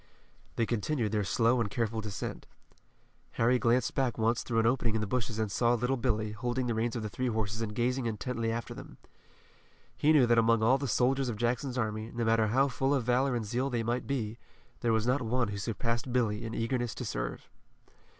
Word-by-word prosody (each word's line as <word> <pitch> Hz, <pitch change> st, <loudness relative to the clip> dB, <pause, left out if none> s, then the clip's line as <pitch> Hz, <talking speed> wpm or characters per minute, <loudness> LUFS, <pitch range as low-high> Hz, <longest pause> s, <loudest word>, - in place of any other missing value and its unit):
They 115 Hz, -, +1 dB
continued 115 Hz, 0 st, -1 dB
their 105 Hz, -1 st, +1 dB
slow 115 Hz, +5 st, +2 dB
and 105 Hz, -, -1 dB
careful 115 Hz, -1 st, -1 dB
descent. 105 Hz, -3 st, -5 dB, 0.9 s
Harry 125 Hz, +2 st, +3 dB
glanced 120 Hz, +1 st, +2 dB
back 130 Hz, -3 st, 0 dB
once 115 Hz, +1 st, +1 dB
through 115 Hz, -, -2 dB
an 115 Hz, -, +3 dB
opening 115 Hz, -2 st, +1 dB
in 110 Hz, -, 0 dB
the -, -, 0 dB
bushes 115 Hz, 0 st, -2 dB
and 110 Hz, -2 st, -1 dB
saw 120 Hz, +3 st, +2 dB
little 125 Hz, +3 st, 0 dB
Billy, 110 Hz, -4 st, -1 dB
holding 120 Hz, +4 st, -2 dB
the 120 Hz, -, 0 dB
reins 115 Hz, +2 st, -1 dB
of 115 Hz, -, -3 dB
the -, -, -2 dB
three 125 Hz, +4 st, -2 dB
horses 110 Hz, -1 st, -2 dB
and 105 Hz, -2 st, -3 dB
gazing 125 Hz, +2 st, 0 dB
intently 115 Hz, +1 st, -2 dB
after 115 Hz, +1 st, -4 dB
them. -, -, -11 dB, 1.0 s
He 150 Hz, -, +3 dB
knew 145 Hz, -5 st, +6 dB
that 120 Hz, -1 st, +4 dB
among 115 Hz, -1 st, +3 dB
all 130 Hz, +4 st, +4 dB
the 140 Hz, -, -2 dB
soldiers 130 Hz, +3 st, +2 dB
of 110 Hz, -, -3 dB
Jackson's 125 Hz, +3 st, -1 dB
army, 110 Hz, -1 st, -2 dB
no 120 Hz, -1 st, -1 dB
matter 115 Hz, -1 st, +3 dB
how 130 Hz, +6 st, +3 dB
full 135 Hz, +2 st, 0 dB
of 130 Hz, -, 0 dB
valor 125 Hz, +2 st, +2 dB
and 115 Hz, -2 st, -2 dB
zeal 125 Hz, +6 st, -1 dB
they 120 Hz, -3 st, -1 dB
might 120 Hz, +2 st, -2 dB
be, 115 Hz, -4 st, -2 dB, 0.4 s
there 120 Hz, -, +1 dB
was 110 Hz, 0 st, +1 dB
not 130 Hz, +3 st, +2 dB
one 120 Hz, -1 st, 0 dB
who 100 Hz, -1 st, -4 dB
surpassed 115 Hz, +3 st, -2 dB
Billy 115 Hz, -3 st, 0 dB
in 115 Hz, -, -5 dB
eagerness 120 Hz, 0 st, -1 dB
to -, -, -5 dB
serve. -, -, -4 dB
115 Hz, 215 wpm, -30 LUFS, 110-125 Hz, 1.0 s, knew